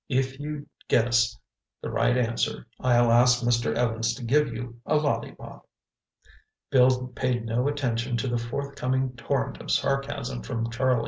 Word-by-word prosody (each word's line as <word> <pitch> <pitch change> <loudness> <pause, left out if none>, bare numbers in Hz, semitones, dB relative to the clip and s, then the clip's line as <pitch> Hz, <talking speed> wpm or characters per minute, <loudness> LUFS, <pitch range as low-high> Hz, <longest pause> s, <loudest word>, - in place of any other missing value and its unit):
If 135 0 0
you 150 0 -5 0.2
guess 115 -1 +3 0.5
the - - -4
right 125 - +2
answer 115 -2 -1
I'll 120 -2 +4
ask 120 +1 +5
Mr. 120 -1 +1
Evans 115 -2 0
to 130 - -9
give 145 +3 +2
you 120 +1 -7
a - - 0
lollipop." 150 -2 -3 1.0
Bill 125 -1 +4
paid 125 -2 -1
no 120 +4 0
attention 125 -4 -1
to 130 +3 -2
the 120 -1 0
forth 140 +4 -4
coming 130 -1 -1
torrent 115 - -2
of - - -9
sarcasm 135 -2 -1
from 115 -2 -3
Charlie. 130 +1 +2
125 Hz, 150 wpm, -26 LUFS, 115-135 Hz, 1.0 s, ask